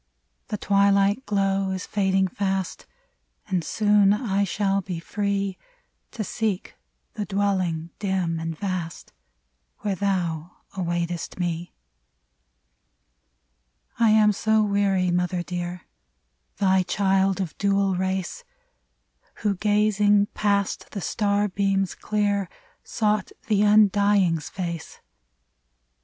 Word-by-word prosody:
The 210 - -3
twilight 200 +4 +2
glow 195 -1 +1
is 190 0 -3
fading 190 -1 +1
fast, 190 0 -3 0.6
And 185 -4 0
soon 205 +1 +3
I 200 -2 0
shall 195 0 0
be 180 -2 -5
free 200 +1 -2 0.5
To 225 - -4
seek 210 -2 -3 0.4
the 210 - -3
dwelling, 185 -4 -1
dim 185 -5 -1
and 165 -1 -4
vast, 185 -4 -4 0.7
Where 205 -2 -1
thou 180 -4 -2 0.2
awaitest 175 -1 -3
me. 175 -1 -3 2.2
I 230 -1 +5
am 215 -1 +5
so 220 +2 +2
weary, 200 -3 +1
mother 180 0 0
dear! 175 0 -5 0.4
— - - -48
Thy 190 -2 +3
child, 195 +1 +1
of 180 -5 -3
dual 195 -1 +2
race, 190 - -2 1.0
Who 205 -2 +2
gazing 205 0 +2
past 200 -2 0
the 200 - -4
star 205 +2 +1
beams 195 -1 0
clear. 205 -3 -1 0.3
Sought 210 -3 0
the 210 -3 +2
Undying's 205 -5 +4
face 170 -4 -5
195 Hz, 105 wpm, -24 LUFS, 180-205 Hz, 2.2 s, I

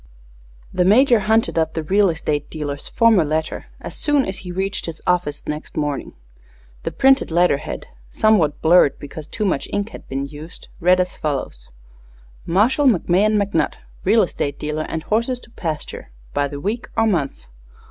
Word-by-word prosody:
The 180 - +2
Major 235 +5 +5
hunted 220 -3 +2
up 160 0 -1
the 160 - -2
real 195 +4 +3
estate 150 -3 -2
dealer's 145 -2 -5
former 225 -6 +4
letter 155 +1 -2
as - - -7
soon 290 -2 +2
as 190 - -5
he 180 - -7
reached 190 +1 -3
his 165 -1 -6
office 175 -5 0
next 150 +1 -5
morning. 145 -2 -2 0.7
The - - -2
printed 270 0 +4
letter 170 -2 +3
head, - - -6 0.2
somewhat 180 - +2
blurred, 165 -3 +5
because 145 +1 -9
too 210 - -3
much 180 -8 0
ink 205 +1 -1
had - - -12
been 135 +1 -2
used, 150 +4 -11
read 180 +1 +4
as 180 0 -1
follows: 135 - -4 0.8
Marshall 235 - +3
McMahon 210 0 +3
McNutt, 200 -5 0 0.3
Real - - +4
Estate 140 -1 -3
Dealer 150 +1 -3
& - - -16
Horses 235 +3 0
to 235 - -16
Pasture 160 - -5 0.2
by 145 0 +1
the 140 0 -7
week 215 +9 -3
or 225 - +4
month. 165 -11 -1
175 Hz, 170 wpm, -21 LUFS, 150-210 Hz, 0.8 s, Major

